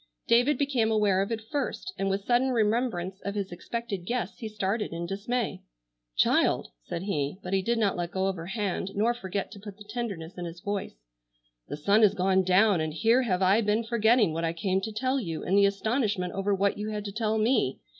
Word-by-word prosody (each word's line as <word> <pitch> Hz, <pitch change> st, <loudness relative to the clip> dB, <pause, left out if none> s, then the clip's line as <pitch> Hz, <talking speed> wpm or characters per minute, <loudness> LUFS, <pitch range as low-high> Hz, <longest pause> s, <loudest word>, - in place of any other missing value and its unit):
David 245 Hz, +5 st, +4 dB
became 270 Hz, -6 st, +1 dB
aware 210 Hz, -3 st, +3 dB
of 200 Hz, +3 st, -2 dB
it 220 Hz, -1 st, -4 dB
first, 295 Hz, +5 st, -3 dB
and 195 Hz, -, -1 dB
with 195 Hz, +1 st, -2 dB
sudden 245 Hz, +2 st, +3 dB
remembrance 215 Hz, -5 st, 0 dB
of 200 Hz, 0 st, -3 dB
his 200 Hz, -2 st, -3 dB
expected 205 Hz, +1 st, -5 dB
guests 240 Hz, +6 st, -3 dB
he 225 Hz, -, -4 dB
started 210 Hz, +1 st, -2 dB
in 170 Hz, +1 st, -3 dB
dismay. 215 Hz, +6 st, -2 dB, 0.6 s
"Child!" -, -, +3 dB
said 170 Hz, -, -5 dB
he,—but 180 Hz, +1 st, -3 dB
he 190 Hz, -, +3 dB
did 235 Hz, +5 st, 0 dB
not 210 Hz, -4 st, +2 dB
let 175 Hz, -1 st, -2 dB
go 190 Hz, +1 st, -1 dB
of 195 Hz, -1 st, 0 dB
her 165 Hz, -1 st, -7 dB
hand, 195 Hz, -2 st, -2 dB
nor 220 Hz, +4 st, +2 dB
forget 195 Hz, -4 st, -4 dB
to 200 Hz, -, -10 dB
put 205 Hz, -1 st, -10 dB
the 205 Hz, -, -11 dB
tenderness 205 Hz, -7 st, -5 dB
in 175 Hz, -, -4 dB
his 170 Hz, 0 st, -7 dB
voice, 200 Hz, -, -4 dB, 0.6 s
"the 145 Hz, -, -5 dB
sun 200 Hz, +8 st, +3 dB
has 210 Hz, -2 st, +5 dB
gone 190 Hz, 0 st, +3 dB
down, 185 Hz, 0 st, +4 dB
and 155 Hz, -1 st, -3 dB
here 230 Hz, +9 st, +4 dB
have 190 Hz, -6 st, 0 dB
I 195 Hz, +4 st, +4 dB
been 210 Hz, +1 st, +1 dB
forgetting 225 Hz, -4 st, +3 dB
what 165 Hz, +1 st, -2 dB
I 165 Hz, 0 st, 0 dB
came 190 Hz, +3 st, 0 dB
to 220 Hz, -, -4 dB
tell 255 Hz, +5 st, 0 dB
you 165 Hz, -9 st, -4 dB
in 190 Hz, -, +1 dB
the 200 Hz, 0 st, +6 dB
astonishment 205 Hz, -3 st, -1 dB
over 195 Hz, +1 st, -1 dB
what 200 Hz, +1 st, +1 dB
you 210 Hz, +1 st, -3 dB
had 210 Hz, -1 st, -4 dB
to 200 Hz, -, -4 dB
tell 220 Hz, +1 st, 0 dB
me. 220 Hz, -, +2 dB
205 Hz, 215 wpm, -28 LUFS, 185-225 Hz, 0.6 s, the